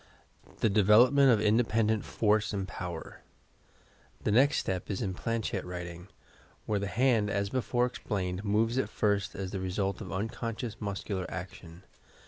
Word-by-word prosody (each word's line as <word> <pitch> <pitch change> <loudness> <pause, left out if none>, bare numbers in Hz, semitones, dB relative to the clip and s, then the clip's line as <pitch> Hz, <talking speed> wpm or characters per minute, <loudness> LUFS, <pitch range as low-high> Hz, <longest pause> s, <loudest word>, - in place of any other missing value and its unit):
THE 115 - +4
DEVELOPMENT 120 +7 +6
OP 110 - -1
INDEPENDENT 110 0 +2
FORCE 110 0 +1
AND 95 -2 -2
POWER 90 -3 -7 1.0
The - - +1
next 135 +7 +4
step 95 -1 -2
is 100 - -2
in 95 -4 -2
Planchette 115 0 -2
writing, 90 0 -7 0.6
where 105 -1 0
the 100 - -2
hand, 115 -2 +2
as 100 0 -1
before 125 -1 +1
explained, 95 -6 -3
moves 110 +4 +1
at - - -1
first 100 -3 0
as 95 -1 -4
the 95 - -3
result 95 +1 -2
of - - -7
unconscious 115 +2 -4
muscular 100 -2 -3
action. 90 -1 -8
105 Hz, 145 wpm, -30 LUFS, 95-115 Hz, 1.0 s, DEVELOPMENT